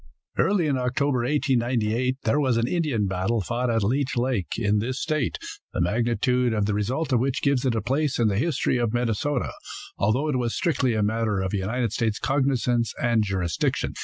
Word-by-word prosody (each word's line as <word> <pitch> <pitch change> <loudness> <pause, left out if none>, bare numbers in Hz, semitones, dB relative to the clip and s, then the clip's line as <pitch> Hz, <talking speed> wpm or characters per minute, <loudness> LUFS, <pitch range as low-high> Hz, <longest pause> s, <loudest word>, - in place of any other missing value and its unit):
Early 190 -4 +2
in 140 -3 +1
October, 130 +1 0
1898, 125 -2 0
there 115 +6 +2
was 130 -5 +2
an 115 +1 +1
Indian 145 - 0
battle 95 +4 0
fought 120 +5 -1
at 115 -2 +1
Leech 130 +4 0
lake, 120 -6 -1
in 105 -2 +1
this 125 +5 -2
state, 155 -6 -1 0.4
the - - -2
magnitude 120 +5 +1
of 105 -1 +1
the 105 - 0
result 130 +8 -1
of 120 - +4
which 130 +1 -1
gives 140 -2 +2
it 120 - +1
a 110 - -1
place 135 +3 0
in 115 - +3
the 100 -1 +1
history 155 -3 +1
of 120 -2 0
Minnesota, 120 +3 -1 0.5
although 120 +9 +1
it 135 -4 0
was 120 -2 -1
strictly 140 - +1
a 105 - +1
matter 110 -1 0
of 95 0 -2
United 110 +4 -1
States 110 -3 0
cognizance 125 -3 0
and 120 -2 +2
jurisdiction. 95 -5 -1
120 Hz, 190 wpm, -25 LUFS, 110-130 Hz, 0.5 s, of